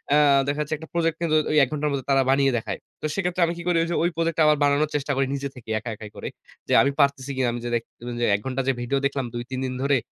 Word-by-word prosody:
আ - - +6 0.3
দেখা 145 +1 -1
যাচ্ছে, 150 +1 -3
একটা 160 +1 -11
প্রজেক্ট 165 -1 +1
কিন্তু 160 -2 +1
ঐ - - 0
১ 130 - +2
ঘন্টার 150 0 -1
মধ্যে 140 -2 -3
তারা 135 - +5
বানিয়ে 135 0 +4
দেখায়। 105 -3 -4 0.2
তো - - -4
সেক্ষেত্রে 180 -2 -1
আমি 170 - -2
কি 170 - -7
করি? 175 - +3
ঐযে 170 +1 -2
ঐ 170 - +2
প্রজেক্টটা 165 -1 +1
আবার 150 0 +4
বানানোর 145 +1 +3
চেষ্টা 145 0 -1
করি, 135 +1 +2
নিজে 140 0 -3
থেকেই 110 -3 -6
একা 115 - -7
একাই 105 0 -9
করে। - - -6 0.4
যে, - - 0
আমি 140 - +2
পারতেছি 140 -1 +2
কিনা? 130 -1 +1
"আমি 120 - -4
যে, - - -2
একটু, 115 - -22 0.2
যে, - - +3
১ - - -2
ঘন্টার 130 0 -1
যে, 135 - +3
ভিডিও 130 +3 0
দেখলাম, 140 -2 -1
২-৩ 125 +2 -4
দিন 130 - -3
ধরে, 140 0 +3
140 Hz, 275 wpm, -24 LUFS, 130-155 Hz, 0.4 s, আ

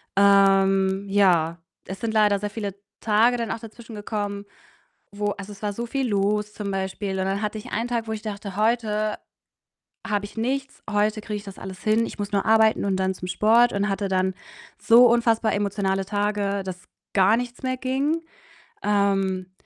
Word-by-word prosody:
Ähm, 195 -1 +4
ja, 175 -4 +3 0.3
es 190 +1 -7
sind 225 -1 -2
leider 210 -2 +4
sehr 205 0 -3
viele 200 -3 -5 0.3
Tage 230 +3 +3
dann 230 -4 -3
auch 225 - -3
dazwischen 225 0 -11
gekommen, 205 -1 -4 0.7
wo 205 0 -2
also, 200 +1 -8
es 200 +1 -13
war 205 -1 -1
so 235 +3 -4
viel 270 0 -1
los 210 +1 0
zum 205 -2 -5
Beispiel, 190 0 -3
und 190 - 0
dann 195 +2 -1
hatte 210 0 -2
ich 210 - -9
einen 230 +3 -1
Tag, 235 -2 -2
wo - - -4
ich 215 - -5
dachte: 205 -3 -6
„Heute 215 -1 0 0.9
habe 205 -1 -1
ich 205 - -10
nichts, 270 +4 -3
heute 210 +1 +1
kriege 210 -1 -5
ich 205 - -7
das 195 -1 -10
alles 190 -1 -8
hin. 220 +2 +2
Ich - - -9
muss 205 0 -4
nur 200 - +1
arbeiten 220 -1 +4
und 190 -1 +1
dann 190 0 0
zum 180 0 -7
Sport.“ 225 +6 +4
Und 200 +1 0
hatte 195 0 -1
dann 185 0 0 0.4
so 240 +2 +7
unfassbar 230 -1 +2
emotionale 195 -1 -1
Tage, 205 -1 -1
dass 180 -1 -8 0.3
gar 195 +3 +5
nichts 245 +2 -5
mehr 255 0 -1
ging. 275 +5 -1 0.6
Ähm, 195 -2 +1
205 Hz, 185 wpm, -24 LUFS, 195-225 Hz, 0.9 s, so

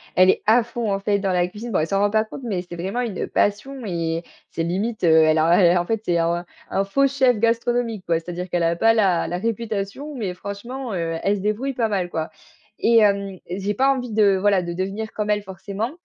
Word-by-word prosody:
elle 185 0 +6
est - - +3
à 230 +3 +5
fond, 235 -1 -4
en 195 - -1
fait, 200 0 +1
dans 195 -2 -1
la 175 0 +2
cuisine. 220 +5 -7
Bon, - - +3
elle 155 - 0
s'en 195 +2 0
rend 205 +1 +3
pas 215 +1 +2
compte, 225 +4 -10
mais 195 -6 -2
c'est 175 -1 -9
vraiment 195 +8 -2
une 225 -6 -3
passion 235 +5 -1
et 165 -3 -2 0.3
c'est 165 - -2
limite, 200 +7 -2
heu, - - +4
elle 160 0 +5
a 170 +2 +5
et - - +3
en 175 - 0
fait, 225 +2 -1
c'est 175 - +1
un 170 +1 0 0.2
un 195 - 0
faux 275 +8 +2
chef 260 -4 +2
gastronomique, 230 -2 0
quoi. 165 -1 +1
C'est-à-dire 175 +2 -6
qu'elle 175 -1 0
a 165 0 +1
pas 225 +4 +4
la 195 -6 +2
la 175 - -2
réputation, 225 +6 -3
mais 205 -8 -3
franchement, 220 +6 -6
heu, 165 -2 -2
elle 200 - +2
se - - -6
débrouille 215 +7 -1
pas 230 -3 0
mal, 190 -4 -1
quoi 160 -2 -3 0.5
et 230 0 +4
hem, 200 -3 +2
j'ai 195 +3 -2
pas 265 +6 +2
envie 250 -2 -5
de 210 -2 +4
voilà, 195 0 +2
de 175 -1 -4
devenir 195 +5 -4
comme 210 -1 -3
elle 210 0 +2
forcément, 195 +4 -5
200 Hz, 240 wpm, -22 LUFS, 180-225 Hz, 0.5 s, elle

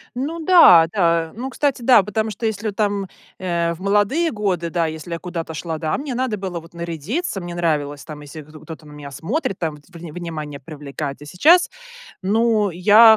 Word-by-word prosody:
Ну 295 +7 -3
да, 315 - +7
да. 170 -4 +2
Ну 260 +3 -4
кстати, 275 -3 0
да, 235 -4 +6
потому 215 +2 -2
что 225 +3 -5
если 220 0 -2
вот 205 - -3
там, 205 -2 0 0.3
э, 170 -2 0
в 165 - -12
молодые 210 - +2
годы, 185 -6 -1
да, 170 -1 0
если 160 +1 -6
я 165 - -3
куда-то 170 -3 -5
шла, 160 0 -4
да, 155 0 -1
мне 275 -2 -4
надо 255 -3 0
было 185 -3 -4
вот 165 +1 -16
нарядиться. 170 - -3
Мне 175 -1 -6
нравилось 145 -4 -1
там 155 -2 -9
если 150 +2 -9
гдо 155 +1 -14
кто-то 160 -1 -10
на 150 - -13
меня 145 -1 -9
смотрит 195 - -2
там, 160 -3 -3 0.2
врне 170 -2 -9
внимание 155 -4 -6
привлекать. 145 -1 -6
А - - -9
сейчас 315 - +5 0.5
ну, 215 0 +2
я 215 +6 +7
175 Hz, 195 wpm, -21 LUFS, 160-220 Hz, 0.5 s, да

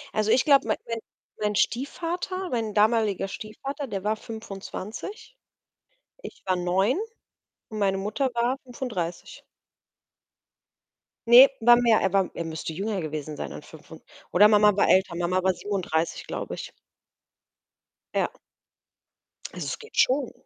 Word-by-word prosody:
Also 215 0 +1
ich 250 - +4
glaube, 275 -6 +5
mein 215 - +1
mein 230 -1 -3 0.4
mein 210 -1 0
Stiefvater 350 - -2
mein 225 -3 -2
damaliger 215 -2 +2
Stiefvater, 270 +8 -6
der 195 -3 -4
war 215 +1 +1
25. 220 - -8 0.9
Ich - - -10
war 185 -1 +1
9 190 - +1 0.7
und 215 -1 -7
meine 195 -1 +1
Mutter 215 +7 -1
war 240 +3 0
35. 220 -10 -5 1.8
Ne, 245 +3 +10
war 240 +1 +7
mehr, 235 -2 +4
er 190 - +1
war 195 -1 +2
er 170 - -4
müsste 160 0 -5
jünger 200 +3 -2
gewesen 155 -2 -5
sein - - -5
an - - -8
fünfund 160 +1 -14 0.3
oder 210 +4 +7
Mama 210 -1 +5
war 200 - +3
älter. 185 -2 +3
Mama 180 +2 0
war 190 0 +2
37, 180 -5 -2
glaube - - -5
ich. - - -8 1.4
Ja. - - 0 1.2
Also - - -6
es - - -3
geht 450 +2 -14
schon. 485 +1 +3
210 Hz, 140 wpm, -26 LUFS, 185-240 Hz, 1.8 s, Ne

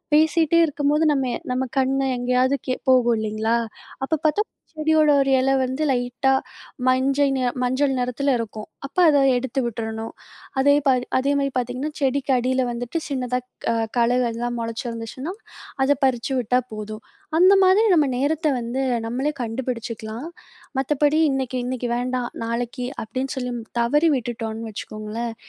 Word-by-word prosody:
பேசிட்டே 315 +1 +4
இருக்கும்போது, 295 +1 +1
நம்மெ 265 -3 0 0.2
நம்ம 255 +1 0 0.2
கண்ணு 270 +1 +1
எங்கேயாவது 250 +2 +2
கே 255 - +1 0.2
போகும் 245 -2 +5
இல்லேங்களா! 220 +2 0 0.5
அப்ப 315 +2 -1
பார்த்தா 310 +7 +3 0.3
செடியோட 310 0 +3
ஒரு 275 0 +1
இல 265 +1 +2
வந்து 260 +4 -1
லைட்டா 250 +1 +1 0.6
மஞ்சை 270 +2 +3
நி 260 - -1 0.2
மஞ்சள் 265 +2 +1
நெறத்தில 250 +3 0
இருக்கும். 220 -2 -6 0.2
அப்ப 275 - -11
அத 290 - +4 0.2
எடுத்து 265 +2 -2
விட்றணும். 225 -1 -4 0.5
அதே 285 +2 +5
பாதி 255 -2 +3
அதேமாதிரி 275 +1 +1
பார்த்தீங்கன்னா, 250 +4 -2
செடிக்கு 275 0 0
அடியில 255 +1 +1
வந்துட்டு 245 +6 -3
சின்னதா 250 -3 -1 0.3
க - - +3 0.3
களைகள்லாம் 240 0 +1
முளச்சிருந்துச்சுன்னா, 230 +6 -5 0.5
அத 285 +1 +3
பறிச்சு 255 0 0
விட்டா 250 +1 +2
போதும். 215 +1 -7 0.4
அந்த 370 +3 +7
மாதிரி 380 +4 +5
நம்ம 300 -3 +4
நேரத்த 305 +4 0
வந்து 240 +3 -2 0.2
நம்மளே 265 +6 -1
கண்டுபிடிச்சுக்கலாம். 230 +1 -4 0.5
மத்தபடி 295 +3 +2
இன்னைக்கி 260 -1 -2
இன்னைக்கி 250 -1 -3
வேண்டாம். 250 0 -2 0.2
நாளைக்கி 245 +2 -3 0.2
அப்பிடின்னு 260 +4 -4
மு - - -4
சொல்லி 250 -1 -2 0.3
தவறி 295 +8 +3
விட்டுட்டோன்னு 225 -2 -5
வச்சுக்கோங்களேன், 215 +2 -5
255 Hz, 135 wpm, -23 LUFS, 235-280 Hz, 0.6 s, அந்த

